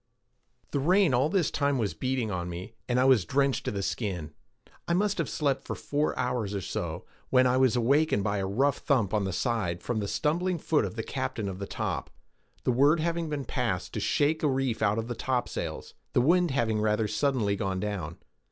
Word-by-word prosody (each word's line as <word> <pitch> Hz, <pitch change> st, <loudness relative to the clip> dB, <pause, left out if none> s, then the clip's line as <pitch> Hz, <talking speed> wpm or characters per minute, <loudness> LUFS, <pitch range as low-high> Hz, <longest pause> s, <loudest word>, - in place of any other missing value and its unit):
The 140 Hz, -, 0 dB
rain 180 Hz, +1 st, +4 dB
all 130 Hz, +5 st, +3 dB
this 185 Hz, -4 st, +1 dB
time 140 Hz, -1 st, +1 dB
was 110 Hz, -5 st, -1 dB
beating 130 Hz, -4 st, -1 dB
on 90 Hz, -2 st, -3 dB
me, 90 Hz, +6 st, -7 dB, 0.2 s
and 125 Hz, 0 st, +2 dB
I 130 Hz, -, +4 dB
was 130 Hz, -7 st, +5 dB
drenched 135 Hz, -, +1 dB
to -, -, -1 dB
the 100 Hz, -1 st, -3 dB
skin. 90 Hz, -11 st, -3 dB, 0.5 s
I 170 Hz, -, +2 dB
must 205 Hz, 0 st, +1 dB
have 165 Hz, -, 0 dB
slept 140 Hz, -3 st, 0 dB
for -, -, -4 dB
four 145 Hz, +1 st, -1 dB
hours 115 Hz, -5 st, -1 dB
or 100 Hz, -, -2 dB
so, -, -, -4 dB, 0.2 s
when 130 Hz, -1 st, +5 dB
I 125 Hz, 0 st, +3 dB
was 130 Hz, -2 st, +4 dB
awakened 130 Hz, -1 st, +2 dB
by 100 Hz, 0 st, 0 dB
a 95 Hz, -, -1 dB
rough 135 Hz, +8 st, +1 dB
thump 120 Hz, -10 st, +1 dB
on 105 Hz, -2 st, +1 dB
the 95 Hz, -, -2 dB
side 95 Hz, -5 st, -1 dB
from 120 Hz, -3 st, -1 dB
the 100 Hz, -, -2 dB
stumbling 175 Hz, -, 0 dB
foot -, -, +1 dB
of -, -, -6 dB
the -, -, -3 dB
captain 100 Hz, +10 st, -3 dB
of 95 Hz, -1 st, -5 dB
the 100 Hz, -, -4 dB
top, -, -, -3 dB, 0.5 s
the -, -, +2 dB
word 140 Hz, +6 st, +4 dB
having 165 Hz, 0 st, -1 dB
been 145 Hz, -3 st, -3 dB
passed -, -, -2 dB
to -, -, -2 dB
shake 150 Hz, +2 st, +1 dB
a 150 Hz, -, +2 dB
reef 130 Hz, -4 st, 0 dB
out 100 Hz, +2 st, +2 dB
of 115 Hz, 0 st, -2 dB
the 120 Hz, -, -3 dB
topsails, 125 Hz, +1 st, -3 dB, 0.2 s
the -, -, +4 dB
wind 175 Hz, +6 st, +4 dB
having 115 Hz, -6 st, 0 dB
rather 105 Hz, 0 st, +1 dB
suddenly 105 Hz, -1 st, +1 dB
gone 95 Hz, -2 st, -2 dB
down. 95 Hz, -5 st, -4 dB
125 Hz, 215 wpm, -28 LUFS, 105-145 Hz, 0.5 s, was